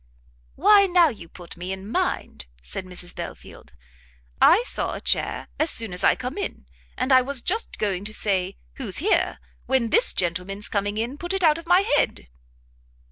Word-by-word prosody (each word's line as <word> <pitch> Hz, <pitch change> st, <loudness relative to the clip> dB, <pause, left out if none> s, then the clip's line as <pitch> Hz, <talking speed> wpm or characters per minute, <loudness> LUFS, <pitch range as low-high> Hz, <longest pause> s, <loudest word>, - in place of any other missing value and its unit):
"Why 400 Hz, +4 st, +5 dB
now 350 Hz, -3 st, +4 dB
you 190 Hz, -, -10 dB
put 175 Hz, 0 st, -12 dB
me 180 Hz, +2 st, -6 dB
in 190 Hz, +1 st, -6 dB
mind," 215 Hz, -, -3 dB, 0.2 s
said 185 Hz, -, -6 dB
Mrs 180 Hz, -1 st, -7 dB
Belfield, -, -, -10 dB, 0.7 s
"I 410 Hz, +7 st, +6 dB
saw -, -, -1 dB
a -, -, -6 dB
chair -, -, -1 dB
as 310 Hz, -, +2 dB
soon 225 Hz, -5 st, 0 dB
as 180 Hz, -, -1 dB
I -, -, +5 dB
come 255 Hz, +9 st, -6 dB
in; 400 Hz, -, -5 dB, 0.3 s
and 255 Hz, +2 st, -1 dB
I 255 Hz, -, +7 dB
was 270 Hz, +1 st, -1 dB
just 435 Hz, -, -3 dB
going 195 Hz, -3 st, -2 dB
to 215 Hz, -, -5 dB
say 190 Hz, -2 st, 0 dB, 0.2 s
who's 225 Hz, -9 st, -1 dB
here, 390 Hz, +8 st, +1 dB, 0.3 s
when 260 Hz, -4 st, +1 dB
this -, -, +5 dB
gentleman's 185 Hz, +3 st, -1 dB
coming 215 Hz, +6 st, -2 dB
put 350 Hz, +2 st, -4 dB
it 385 Hz, -1 st, -2 dB
out 315 Hz, -1 st, +4 dB
of 335 Hz, -, -13 dB
my 355 Hz, +2 st, +5 dB
head." 290 Hz, -, 0 dB
235 Hz, 180 wpm, -23 LUFS, -, 0.7 s, I